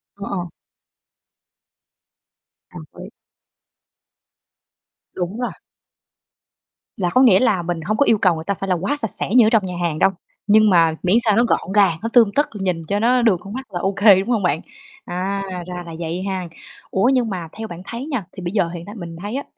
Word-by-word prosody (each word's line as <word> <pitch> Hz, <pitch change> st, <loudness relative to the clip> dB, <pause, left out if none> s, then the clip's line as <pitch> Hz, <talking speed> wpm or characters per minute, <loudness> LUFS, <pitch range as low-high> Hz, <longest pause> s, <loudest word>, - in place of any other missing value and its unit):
Ờ, 200 Hz, 0 st, -8 dB
ờ. 180 Hz, -3 st, -3 dB, 2.3 s
Đồng -, -, -9 dB, 0.2 s
ý. -, -, -10 dB, 2.0 s
Đúng 185 Hz, +6 st, -4 dB
rồi. 245 Hz, -, -2 dB, 1.5 s
Là 180 Hz, -3 st, 0 dB
có 255 Hz, -, +3 dB
nghĩa 210 Hz, -8 st, +6 dB
là 210 Hz, -8 st, +2 dB
mình 170 Hz, -1 st, -3 dB
hông 215 Hz, +7 st, -2 dB
có 285 Hz, -, +4 dB
yêu 225 Hz, -, +4 dB
cầu 180 Hz, -4 st, +3 dB
người 160 Hz, -, -6 dB
ta 200 Hz, -, +1 dB
phải 195 Hz, +1 st, -6 dB
là 180 Hz, -, +3 dB
quá 195 Hz, -, -1 dB
sạch 225 Hz, -8 st, -1 dB
sẽ -, -, -1 dB
như 240 Hz, -3 st, +7 dB
ở -, -, +4 dB
trong 220 Hz, -4 st, +2 dB
nhà 180 Hz, -1 st, -5 dB
hàng 160 Hz, -3 st, -1 dB
đâu, 195 Hz, -, +5 dB, 0.4 s
nhưng 215 Hz, +1 st, +5 dB
mà 165 Hz, -3 st, +4 dB
miễn 185 Hz, +3 st, +3 dB
sao 215 Hz, -3 st, +3 dB
nó 235 Hz, -, +5 dB
gọn 230 Hz, -, -1 dB
gàng, 195 Hz, -6 st, +4 dB
nó 230 Hz, -, -3 dB
tươm 230 Hz, -5 st, +5 dB
tất, 290 Hz, -, +2 dB
nhìn 180 Hz, -3 st, -1 dB
cho 205 Hz, +3 st, 0 dB
nó 245 Hz, +3 st, +3 dB
được 225 Hz, -6 st, +3 dB
con 200 Hz, +3 st, -10 dB
mắt 265 Hz, -2 st, -7 dB
là 175 Hz, -, -2 dB
ô 195 Hz, +2 st, 0 dB
kê, 200 Hz, -3 st, +7 dB
đúng 195 Hz, -, -4 dB
hông 225 Hz, -5 st, +1 dB
bạn? 180 Hz, -, 0 dB, 0.4 s
À, 190 Hz, +3 st, -3 dB, 0.3 s
ra 180 Hz, 0 st, -6 dB
là 165 Hz, -, -9 dB
vậy 170 Hz, +2 st, -4 dB
ha. 185 Hz, -2 st, -3 dB, 0.4 s
Ủa, 215 Hz, +7 st, +2 dB
nhưng 245 Hz, -3 st, +1 dB
mà 180 Hz, -4 st, -5 dB
theo 220 Hz, 0 st, -5 dB
bạn 175 Hz, -2 st, -9 dB
thấy 235 Hz, +5 st, -6 dB
nha 270 Hz, -, -3 dB
thì 190 Hz, -, -10 dB
bây 175 Hz, -, -3 dB
giờ 195 Hz, -5 st, +1 dB
hiện 170 Hz, 0 st, -8 dB
tại 205 Hz, +2 st, -10 dB
mình 170 Hz, -4 st, -8 dB
thấy 205 Hz, +5 st, -5 dB
á 280 Hz, -, -3 dB
195 Hz, 215 wpm, -20 LUFS, 180-225 Hz, 2.3 s, như